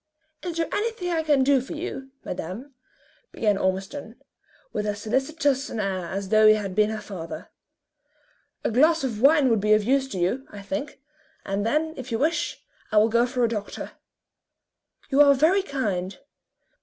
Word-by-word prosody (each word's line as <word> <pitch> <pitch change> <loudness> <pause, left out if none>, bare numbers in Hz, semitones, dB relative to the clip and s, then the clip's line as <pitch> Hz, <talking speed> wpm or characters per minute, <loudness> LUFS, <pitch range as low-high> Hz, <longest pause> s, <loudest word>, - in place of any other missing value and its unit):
"Is 345 -2 -5
there 330 - +1
anything 415 -5 -2
I 330 -1 +1
can 295 -4 +3
do 275 -1 +4
for 260 - -7
you, 300 -5 -6 0.2
madame?" 190 - -6 0.6
began 210 -2 +1
Ormiston, 195 +6 -3 0.6
with 210 - -2
as 205 0 -2
solicitous 270 +5 0
an 225 - -4
air 190 -4 -2
as 195 +1 -4
though 215 0 +6
he 215 - +7
had 200 -3 -4
been 210 +2 +3
her 220 0 -3
father. 190 -5 -8 1.1
"A - - 0
glass 315 +7 +4
of 225 -5 -3
wine 285 +1 +6
would 225 -3 +2
be 210 +1 +4
of 215 0 +3
use 270 +4 +2
to 235 - -6
you, 190 +10 -1
I 200 -1 -10
think, 290 +6 -5 0.5
and 195 +1 -1
then, 310 +5 0
if 260 -1 -7
you 225 - +1
wish, 315 +7 -1 0.3
I 215 - +1
will 215 +2 +5
go 235 +2 +3
for 250 0 -1
a - - +4
doctor." 210 -3 -5 1.2
"You 275 +2 +5
are 280 -1 +7
very 325 +8 +4
kind. 200 - -3
245 Hz, 180 wpm, -25 LUFS, 210-285 Hz, 1.2 s, he